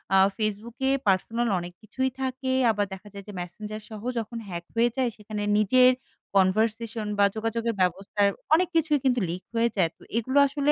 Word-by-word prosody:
আ - - +7 0.2
ফেসবুকে 225 +5 -2 0.2
পার্সোনাল 225 +5 +2
অনেক 175 0 -7
কিছুই 260 +5 -1
থাকে। 260 0 -2 0.2
আবার 205 -1 0
দেখা 190 +2 -10
যায় 200 -1 -8
যে 205 - -8
মেসেঞ্জার 210 +5 -6
সহ 215 -2 -8 0.2
যখন 230 +1 -5
হ্যাক 170 -2 -6
হয়ে 235 +1 +4
যায় 255 -2 +2
সেখানে 210 0 -5
নিজের 250 +5 +6 0.4
কনভারসেশন 220 +3 +1
বা 200 - +7
যোগাযোগের 225 +1 -1
ব্যবস্থার 195 +3 +1 0.2
অনেক 360 +3 +5
কিছুই 310 -3 +3
কিন্তু 250 -2 +3
লিক 180 +2 -4
হয়ে 230 +1 +3
যায়। 180 -5 +3
তো - - -31 0.2
এগুলো 260 +5 0
আসলে 285 +1 +1
220 Hz, 175 wpm, -26 LUFS, 200-250 Hz, 0.4 s, আ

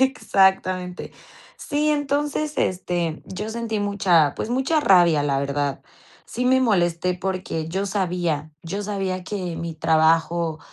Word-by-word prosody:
Exactamente. 190 -7 +1 0.4
Sí, 300 +1 -1
entonces, 295 +1 -1
este, 175 -3 -1
yo 210 +3 -5
sentí 225 -2 -3
mucha, 190 -7 +2
pues, 225 - -4
mucha 265 +6 +1
rabia, 175 - +5
la 140 -1 0
verdad. 140 0 -2 0.4
Sí 245 - -4
me 260 +1 +4
molesté 180 -6 +1
porque 180 -3 -3
yo 195 +4 -2
sabía 175 -6 -1
yo 195 +5 -4
sabía 195 -3 -3
que 180 -5 -4
mi 165 0 -5
trabajo 160 +1 +2
185 Hz, 130 wpm, -23 LUFS, 165-215 Hz, 0.4 s, rabia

